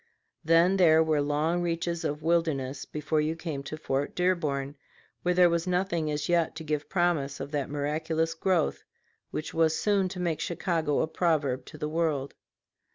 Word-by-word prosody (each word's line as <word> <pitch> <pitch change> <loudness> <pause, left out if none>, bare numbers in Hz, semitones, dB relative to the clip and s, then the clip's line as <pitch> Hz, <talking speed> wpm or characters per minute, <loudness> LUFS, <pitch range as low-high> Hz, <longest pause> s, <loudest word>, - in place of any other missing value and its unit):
Then 165 +4 +4
there 160 -3 +6
were 155 -2 +1
long 150 +4 0
reaches 170 0 -2
of 150 -1 -3
wilderness 155 -5 0
before 150 +1 -1
you 155 +2 -1
came 160 -4 -5
to 145 +3 -6
Fort 140 -2 -2
Dearborn, 150 -6 0 0.5
where 180 0 +1
there 180 0 +7
was 170 +1 0
nothing 180 -3 0
as 150 0 -2
yet 170 -2 +1
to 160 - -6
give 150 -1 -3
promise 170 -7 0
of 140 - -6
that 145 -3 -2
miraculous 155 +3 -1
growth 170 -1 0 0.5
which 155 - -5
was 160 -1 +2
soon 200 -3 +1
to 180 - -7
make 170 -3 -1
Chicago 165 -4 0
a - - 0
proverb 145 -7 0
to 155 - -11
the 150 0 -3
world. 155 -4 -1
160 Hz, 170 wpm, -28 LUFS, 150-170 Hz, 0.5 s, there